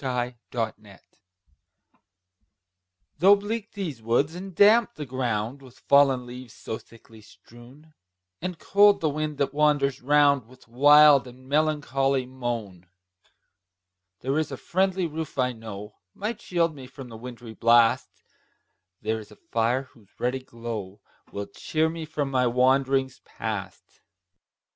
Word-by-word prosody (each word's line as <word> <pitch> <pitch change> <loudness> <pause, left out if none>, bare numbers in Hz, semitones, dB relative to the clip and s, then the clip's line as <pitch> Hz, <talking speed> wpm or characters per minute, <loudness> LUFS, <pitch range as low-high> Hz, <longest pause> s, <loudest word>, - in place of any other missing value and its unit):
THE 125 -2 -2 0.2
CONSOLATION. 110 -4 -5 2.2
Though 195 +5 +7
bleak 210 +2 -5
these 165 - -5
woods, 120 +7 +1
and 185 +1 -8
damp 220 +4 +5
the 150 - -6
ground 125 -1 -2
With 130 -2 -16
fallen 140 -3 +3
leaves 125 -1 -10
so 110 - -6
thickly 115 -1 -18
strown, 125 +8 -17 0.5
And 180 0 -4
cold 205 +4 +4
the 155 -2 0
wind 150 0 -3
that 140 -1 -1
wanders 145 -3 +2
round 140 -2 +3
With 130 0 -19
wild 145 +2 +6
and 130 +1 -14
melancholy 140 -3 +1
moan; 120 -8 -5 1.3
There 135 +4 0
IS 155 -2 -2
a 135 - -5
friendly 190 +3 0
roof, 160 -2 -5
I 125 -1 +2
know, 110 -3 -9 0.2
Might 215 +4 -4
shield 170 -2 0
me 135 -3 -11
from 135 -1 -11
the 115 - -10
wintry 120 -1 -9
blast; 115 +2 +3 0.8
There 110 +1 -1
is 105 -1 -12
a - - -14
fire, 115 +5 -1
whose 115 -6 -23
ruddy 125 +2 -1
glow 115 -5 -7 0.3
Will 100 0 -4
cheer 155 +10 -1
me 165 -1 -6
for 150 -2 -2
my 130 -2 +1
wanderings 130 +1 +2
past. - - -7
130 Hz, 135 wpm, -26 LUFS, 120-150 Hz, 2.2 s, Though